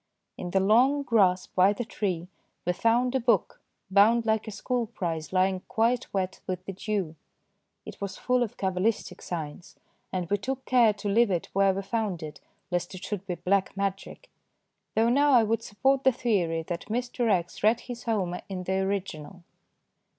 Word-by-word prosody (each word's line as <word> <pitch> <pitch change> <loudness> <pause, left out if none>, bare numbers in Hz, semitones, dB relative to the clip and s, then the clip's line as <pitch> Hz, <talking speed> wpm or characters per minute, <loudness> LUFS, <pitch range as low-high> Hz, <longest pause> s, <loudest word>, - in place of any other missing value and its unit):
In 180 - -6
the 190 - +2
long 250 +9 +4
grass 190 -7 +3
by 190 +2 +3
the 240 +3 -4
tree 185 -6 -3 0.4
we 180 - +1
found 235 +6 +2
a 265 - +2
book 230 -6 +1 0.3
bound 220 +4 +5
like 220 -1 +1
a - - -4
school 235 +3 -2
prize 170 -7 -4
lying 185 0 +2
quite 235 +3 +1
wet 190 -1 -2
with 185 -1 -4
the 195 - -5
dew. 190 -4 -3 0.7
It - - -10
was 195 -1 -4
full 250 0 +1
of 235 -4 -2
cabalistic 190 +3 -1
signs, 165 0 -6 0.4
and 180 -2 -2
we 205 +4 0
took 265 +5 -4
care 240 -3 +5
to 205 0 -6
leave 225 +3 +4
it 175 -3 -1
where 195 0 +4
we 195 - -3
found 200 -4 -2
it 150 -1 -8 0.3
lest 175 +1 -2
it 185 - -9
should 200 -2 -5
be 180 - -2
black 190 +3 0
magic, 200 - -4 0.6
though 225 +1 +3
now 285 +3 +4
I 240 -3 +7
would 225 +1 0
support 265 +5 +1
the 265 - +6
theory 185 -10 0
that 170 +1 -5
Mr. 240 +1 -1
X. 175 -3 -1
read 220 +3 +3
his 245 -1 -8
Homer 190 -6 -1
in 185 -2 -4
the 190 +1 0
original. 190 -3 -3
200 Hz, 180 wpm, -27 LUFS, 185-230 Hz, 0.7 s, I